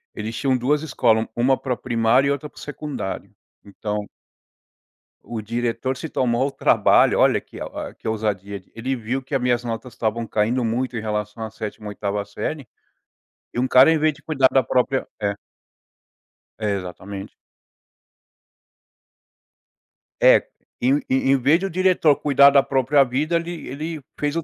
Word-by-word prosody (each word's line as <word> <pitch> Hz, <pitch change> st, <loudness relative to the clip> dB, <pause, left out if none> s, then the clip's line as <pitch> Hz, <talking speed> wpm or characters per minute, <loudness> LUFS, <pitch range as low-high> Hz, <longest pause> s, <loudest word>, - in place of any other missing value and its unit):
eles 110 Hz, +2 st, -5 dB
tinham 135 Hz, -2 st, +1 dB
2 145 Hz, +5 st, +1 dB
escola, 115 Hz, -7 st, +2 dB
u -, -, -10 dB
uma 130 Hz, +2 st, +3 dB
para 130 Hz, -, -2 dB
o -, -, -6 dB
primário 120 Hz, +2 st, +2 dB
e 140 Hz, -, +2 dB
outra 145 Hz, +1 st, -3 dB
para -, -, -28 dB
o -, -, -10 dB
secundário. 145 Hz, -8 st, -5 dB, 0.3 s
Então 105 Hz, +1 st, -4 dB, 1.2 s
o 115 Hz, -2 st, -5 dB
diretor 120 Hz, +4 st, -2 dB
se 160 Hz, -, -6 dB
tomou 120 Hz, -2 st, +1 dB
ao 140 Hz, -, -1 dB
trabalho -, -, +4 dB
olha, -, -, +4 dB
que -, -, -13 dB
a -, -, -4 dB
o -, -, -7 dB
que -, -, -10 dB
ousadia 100 Hz, -2 st, -2 dB
d 95 Hz, -, -27 dB
ele 130 Hz, +4 st, -2 dB
viu 125 Hz, +3 st, -3 dB
que 135 Hz, +2 st, -5 dB
a -, -, +2 dB
minhas 125 Hz, -1 st, +1 dB
notas 120 Hz, +1 st, -5 dB
estavam 115 Hz, +1 st, -2 dB
caindo 115 Hz, +5 st, 0 dB
muito 120 Hz, +2 st, -1 dB
em 110 Hz, -, -3 dB
relação 105 Hz, 0 st, -3 dB
à 110 Hz, -, -4 dB
7ª, 105 Hz, -1 st, -7 dB
8ª 100 Hz, 0 st, -3 dB
série, 130 Hz, +6 st, -5 dB, 0.9 s
e 120 Hz, -, -2 dB
um 130 Hz, -, +1 dB
cara 130 Hz, +5 st, +7 dB
em 165 Hz, -, +3 dB
vez 155 Hz, 0 st, +2 dB
de -, -, -19 dB
cuidar 135 Hz, -5 st, +3 dB
da 135 Hz, -, +4 dB
própria 130 Hz, +1 st, 0 dB
é. 100 Hz, -1 st, 0 dB, 1.3 s
Exatamente. 100 Hz, -1 st, -4 dB, 2.9 s
É, -, -, +6 dB, 0.3 s
em 130 Hz, +3 st, +3 dB
em 135 Hz, +1 st, +2 dB
em 135 Hz, -, +5 dB
vez 145 Hz, +7 st, +3 dB
do 195 Hz, -, -2 dB
diretor 180 Hz, -5 st, +3 dB
cuidar 140 Hz, -1 st, +5 dB
da 140 Hz, -1 st, +5 dB
própria 135 Hz, +1 st, +3 dB
vida, 140 Hz, +6 st, -1 dB
ele 170 Hz, 0 st, -3 dB
ele 155 Hz, +3 st, -5 dB, 0.2 s
fez 145 Hz, +1 st, -1 dB
o 165 Hz, -, -1 dB
125 Hz, 170 wpm, -22 LUFS, 110-140 Hz, 2.9 s, cara